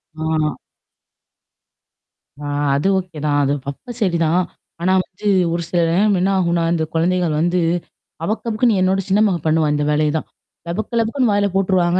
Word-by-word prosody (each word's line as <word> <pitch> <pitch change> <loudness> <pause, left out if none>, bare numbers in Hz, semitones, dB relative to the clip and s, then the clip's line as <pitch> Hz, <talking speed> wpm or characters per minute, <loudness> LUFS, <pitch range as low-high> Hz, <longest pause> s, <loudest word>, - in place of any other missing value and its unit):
ஆ. 155 -1 -1 1.9
ஆ, - - -5 0.3
அது 145 +7 0
ஓகே 180 -4 -5
தான் 145 -1 +2
அது 140 +1 +1 0.2
அப்ப 240 - -10
சரிதான். 170 -2 +2 0.4
ஆனா 185 +2 +2
வந்து 195 +3 -8 0.3
ஒரு 170 - -1
சில 175 - +1
நேரம் 200 +2 +3
என்ன 190 +2 +1
ஆகுன்னா, 170 -2 +1
இந்த 160 - 0
குழந்தைகள் 170 -1 +1
வந்து 175 +2 +1 0.6
அபக்கு, 215 +6 -2
அபக்குன்னு 215 -2 +2
என்னோட 190 +1 +2
சின்ன 195 - +3
மகன் 175 -5 -2
பண்ணுவா 155 -1 +2
இந்த 150 - 0
வேலையே 150 0 +2
தான் - - -5 0.4
லபக்கு, 215 +7 -3
லபக்குன்னு 230 0 +1
வாயில 205 0 +2
போட்டுருவாங்க 185 -2 +2
180 Hz, 155 wpm, -19 LUFS, 160-195 Hz, 1.9 s, நேரம்